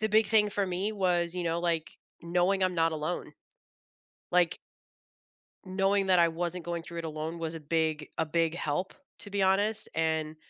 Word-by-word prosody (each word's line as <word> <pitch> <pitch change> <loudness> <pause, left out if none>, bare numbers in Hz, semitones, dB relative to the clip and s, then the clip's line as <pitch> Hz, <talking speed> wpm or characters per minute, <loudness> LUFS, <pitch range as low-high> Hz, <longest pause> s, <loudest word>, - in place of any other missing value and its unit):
the 220 - +1
big 215 +1 +4
thing 210 -2 +4
for 200 -1 0
me 190 +4 -1
was, 175 -3 +1
you 180 - -2
know, 170 0 0
like, 165 -2 -1 0.2
knowing 180 +3 +2
I'm 185 -1 +2
not 165 -1 +2
alone. 155 +3 -3 1.0
Like 175 -2 +3 1.1
knowing 195 +1 +1
that 185 -1 +5
I 170 -1 +6
wasn't 175 +1 -3
going 170 -1 -3
through 170 0 -8
it 165 - -4
alone 155 +1 -4
was 165 0 -3
a 165 - -6
big 155 0 -1
a 160 - +1
big 165 +1 +1
help, 170 +3 -2 0.3
to 205 - -8
be 200 -1 0
honest, 205 +3 +2
and 160 -1 0
175 Hz, 185 wpm, -29 LUFS, 165-190 Hz, 1.1 s, I